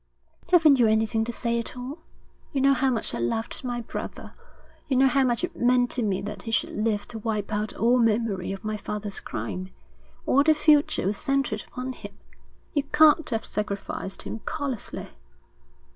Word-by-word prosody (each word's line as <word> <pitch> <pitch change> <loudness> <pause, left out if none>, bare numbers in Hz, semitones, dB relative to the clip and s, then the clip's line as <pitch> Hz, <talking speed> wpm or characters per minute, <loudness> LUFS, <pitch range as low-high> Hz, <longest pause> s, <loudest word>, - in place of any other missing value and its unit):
'Haven't 315 -6 +6
you 235 - +5
anything 220 +1 +2
to 240 - -3
say 235 0 -1
at 235 - -5
all? 260 +6 -6 0.5
You 275 - -1
know 275 +1 +5
how 270 0 +2
much 235 -4 -2
I - - -3
loved 170 - -2
my 245 -1 -2
brother. - - -7 0.5
You 265 -3 +1
know 265 - +6
how 270 +1 +4
much 245 +4 +1
it 355 -1 -3
meant 245 0 +3
to 250 - +1
me 195 -3 0
that 205 -2 -6
he 225 - -7
should 225 - +1
live 210 -1 -1
to 225 - -6
wipe 215 -1 -2
out 210 0 -1
all 240 +2 +3
memory 220 -5 +1
of 195 +2 -6
my 215 0 -2
father's 210 0 -4
crime. 185 +1 -5 0.6
All 275 - +4
the 310 +2 +4
future 300 - +3
was 200 +1 0
centred 275 -6 -1
upon 255 +1 -5
him. - - -11 0.6
You 290 - +2
can't 305 +2 +4
have 225 -3 -2
sacrificed 200 -2 -4
him 225 - -5
callously.' 285 -7 -4
235 Hz, 185 wpm, -26 LUFS, 210-270 Hz, 0.6 s, Haven't